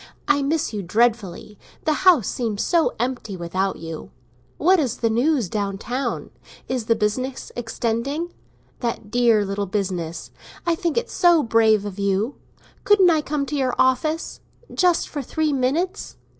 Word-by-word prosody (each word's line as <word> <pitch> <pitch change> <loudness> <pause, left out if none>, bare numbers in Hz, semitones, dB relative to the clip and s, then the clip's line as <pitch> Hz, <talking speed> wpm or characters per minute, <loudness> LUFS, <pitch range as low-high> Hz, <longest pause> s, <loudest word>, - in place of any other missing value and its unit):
I 290 -1 +3
miss 290 -2 0
you 210 - -2
dreadfully; 210 0 0 0.3
the 310 - +3 0.2
house 285 - +4
seems 220 -5 -2
so 335 -2 +2
empty 240 -5 -3
without 185 +3 -1
you. 165 -1 -7 0.5
What 365 +3 +4
is 265 -7 -1
the 230 -1 +1
news 250 - +2
down 200 0 -2
town? 250 +6 -3 0.4
Is 255 -3 -2
the 230 - +4
business 255 +6 -2
extending? 240 +7 -2 0.5
That 235 -3 -4
dear 235 -4 +3
little 200 +1 -2
business—I 185 - -4
think 335 +3 -1
it's 470 - -1
so 345 -3 +5
brave 220 -2 +3
of 205 -1 -6
you! 200 +6 0 0.5
Couldn't 390 -4 +5
I 315 -2 +2
come 295 -1 -2
to 275 - -4
your 260 -3 0
office?—just 315 +5 0
for 290 - -4
three 305 +3 -1
minutes? 310 +10 -1
245 Hz, 145 wpm, -22 LUFS, 205-300 Hz, 0.5 s, so